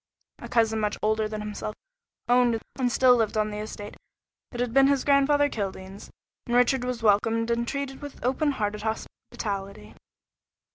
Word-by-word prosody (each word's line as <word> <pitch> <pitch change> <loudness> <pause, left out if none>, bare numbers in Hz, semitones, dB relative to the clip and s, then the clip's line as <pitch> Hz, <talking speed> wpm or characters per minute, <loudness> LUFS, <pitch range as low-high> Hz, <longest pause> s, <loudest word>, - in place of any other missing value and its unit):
A - - -9
cousin 225 -2 +2
much 210 -1 -1
older 215 0 +1
than 215 0 -5
himself 210 0 -5 0.5
owned 245 -2 +3 0.2
and 250 -2 +1
still 250 0 +5
lived 220 -1 0
on 215 0 +1
the 210 - -5
estate 210 -1 -7 0.5
that 240 - -8
had 245 -2 -1
been 270 0 +6
his 280 -1 +2
grandfather 290 +1 +4
Kildene's, 195 -4 -6 0.4
and 240 - 0
Richard 250 +1 +3
was 250 -2 -3
welcomed 225 +2 +2
and 235 0 0
treated 280 0 -4
with 290 -1 -9
openhearted 250 -6 0
hospitality. 200 - -5
230 Hz, 155 wpm, -26 LUFS, 210-255 Hz, 0.5 s, been